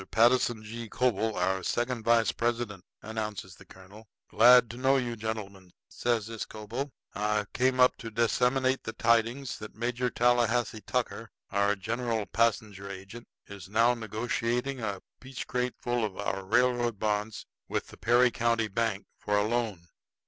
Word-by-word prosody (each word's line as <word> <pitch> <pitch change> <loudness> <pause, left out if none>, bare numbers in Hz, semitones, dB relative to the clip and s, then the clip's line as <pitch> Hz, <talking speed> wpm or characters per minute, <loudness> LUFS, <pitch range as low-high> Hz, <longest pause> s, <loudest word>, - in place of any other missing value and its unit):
Patterson 120 -1 +3
G. 115 +1 -7
Coble, 115 -3 0
our 95 +1 +1
second 120 +4 -1
vice 115 0 +4
president," 115 -5 -2 0.2
announces 105 -4 -5
the - - -16
colonel. 100 +4 -15 0.2
"Glad 120 +2 +7
to 120 - -9
know 135 +2 +3
you, 120 -2 -2
gentlemen," 100 -4 -6 0.2
says 120 -3 0
this 115 -1 -5
Coble. 115 +7 -5 0.2
"I 105 0 0
came 130 0 +1
up 125 0 +5
to 115 - -7
disseminate 125 +3 +1
the 110 - -5
tidings 115 +3 +1
that 110 0 -9
Major 120 +2 -1
Tallahassee 120 -1 +2
Tucker, - - -3 0.2
our 100 +1 +2
general 115 +2 -2
passenger 105 -4 0
agent, 100 +5 -9 0.2
is 100 -3 -10
now 115 +3 +4
negotiating 120 +3 -2
a 100 -4 -4 0.2
peachcrate 125 -1 -3
full 120 -1 -1
of 105 -3 -3
our 95 -1 -3
railroad 120 +1 +2
bonds 105 +1 -2 0.2
with - - -2
the - - -13
Perry 120 +1 +4
County 115 -1 +1
Bank 110 -1 -1
for 105 0 0
a 105 - +3
loan. 110 -6 -2
115 Hz, 150 wpm, -29 LUFS, 105-120 Hz, 0.2 s, Glad